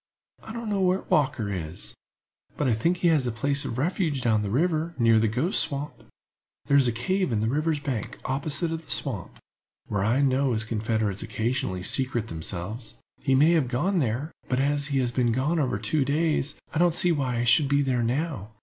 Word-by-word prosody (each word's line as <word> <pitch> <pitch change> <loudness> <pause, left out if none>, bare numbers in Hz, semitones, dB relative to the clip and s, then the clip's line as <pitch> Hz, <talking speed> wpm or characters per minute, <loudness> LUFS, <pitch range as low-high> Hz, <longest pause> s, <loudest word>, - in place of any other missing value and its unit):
"I - - -9
don't 235 0 -6
know 200 -1 0
where 185 +1 +2
Walker 120 -8 +1
is, 85 -3 -5 0.6
but 145 - 0
I 120 - +3
think 170 +12 +1
he 175 - +2
has 150 -6 +2
a - - 0
place 140 +5 0
of 115 - -4
refuge 155 -2 -1
down 110 -3 +2
the 105 - -3
river, 160 - 0
near 115 -2 +4
the 110 - +2
Ghost 130 - +1
Swamp. 150 -2 -1 0.7
There 140 - +2
is 135 -3 +5
a - - +2
cave 185 - -1
in 110 - +1
the 110 - 0
river's 150 +4 0
bank, 130 -7 -3
opposite 140 +4 -1
to 165 - -2
the 160 - -15
swamp, 115 - +1 0.5
where 100 -2 -1
I 120 +7 +2
know 135 -1 +2
his 110 -1 0
confederates 110 -2 -1
occasionally 110 -6 -2
secrete 120 0 0
themselves. 95 +8 -4 0.3
He 135 -1 +2
may 150 +5 +5
have 160 -6 +2
gone 175 +10 0
there; 130 +3 -1 0.2
but, 125 - +1
as 145 +1 +1
he 140 -2 -1
has 125 -2 +1
been 120 -1 +1
gone 140 +8 0
over 130 -8 0
two 110 +8 0
days, 150 +1 0 0.2
I 155 - -1
don't 175 -1 +3
see 175 0 +4
why 130 -6 -1
he 120 - 0
should 120 +5 +4
be 140 +1 +2
there 130 -3 0
now. 120 - -2
135 Hz, 210 wpm, -26 LUFS, 115-155 Hz, 0.7 s, is